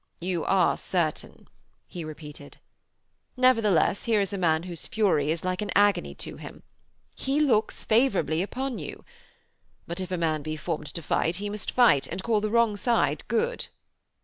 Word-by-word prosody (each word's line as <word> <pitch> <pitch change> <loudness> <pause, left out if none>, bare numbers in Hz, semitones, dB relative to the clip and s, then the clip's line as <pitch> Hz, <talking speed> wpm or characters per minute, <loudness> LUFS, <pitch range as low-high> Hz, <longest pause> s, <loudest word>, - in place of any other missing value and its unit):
'You 175 -1 -2
are 190 -2 +3
certain,' 170 -4 -3 0.4
he 175 - -7
repeated. 150 -2 -10 0.8
'Nevertheless, 225 -9 +3
here 225 -2 +3
is 200 0 -1
a - - -2
man 160 -2 +2
whose 175 -2 -6
fury 185 -9 +1
is 160 +1 -1
like 185 +1 -1
an 210 - -3
agony 205 -3 +3
to - - -6
him. - - -11 0.5
He 275 +2 -1
looks 235 -8 +1
favourably 215 -8 +2
upon 255 +6 -3
you. - - -8 0.8
But, 170 +2 -5
if 185 - -5
a 185 - -2
man 160 -2 0
be 155 +1 -4
formed 155 -2 -4
to 170 - -6
fight 165 +3 0
he 205 +2 -4
must 210 0 -4
fight, 235 - +4
and 185 +2 -5
call 220 -3 +1
the 215 - -1
wrong 230 -2 +2
side 235 +2 +1
good.' 475 +2 -1
190 Hz, 170 wpm, -26 LUFS, 165-220 Hz, 0.8 s, fight